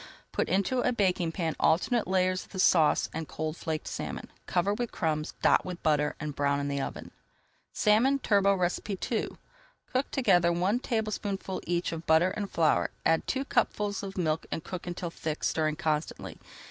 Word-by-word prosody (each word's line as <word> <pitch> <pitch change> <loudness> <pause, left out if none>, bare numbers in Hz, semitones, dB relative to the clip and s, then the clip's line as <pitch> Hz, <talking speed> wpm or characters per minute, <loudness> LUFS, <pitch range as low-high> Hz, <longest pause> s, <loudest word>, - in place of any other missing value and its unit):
Put - - -1
into 200 +8 +1
a 250 - +2
baking 185 -7 +1
pan 165 -3 -1
alternate 215 +8 +2
layers 185 0 +1
of - - -24
the 190 - -5
sauce 165 -4 +4
and 160 -1 -4
cold 155 +4 -4
flaked 160 -2 -4
salmon, - - -5 0.2
cover 185 +3 +1
with 240 +2 -3
crumbs, 155 -2 -2
dot - - +5
with 180 -1 -7
butter, 150 -1 +2
and 150 -2 -4
brown 140 0 +1
in 140 0 -2
the 140 -1 -1
oven. - - -6 0.6
SALMON 230 +7 +3
TURBOT 200 -6 +2 0.3
II 225 - -1 0.5
Cook 260 +2 -1
together 180 - +3
one 185 +7 +1
tablespoonful 215 -5 -2
each 175 0 0
of 165 0 -6
butter 160 +4 +4
and 200 0 -4
flour, 160 -2 +2 0.2
add 165 0 +2
two 265 +1 -1
cupfuls 205 -6 0
of 195 -1 -7
milk 160 -3 0
and 160 - -3
cook 180 0 -6
until 175 -1 -4
thick, 155 -2 -4
stirring 155 -1 +1
constantly. 155 0 -3
180 Hz, 170 wpm, -29 LUFS, 160-200 Hz, 0.6 s, dot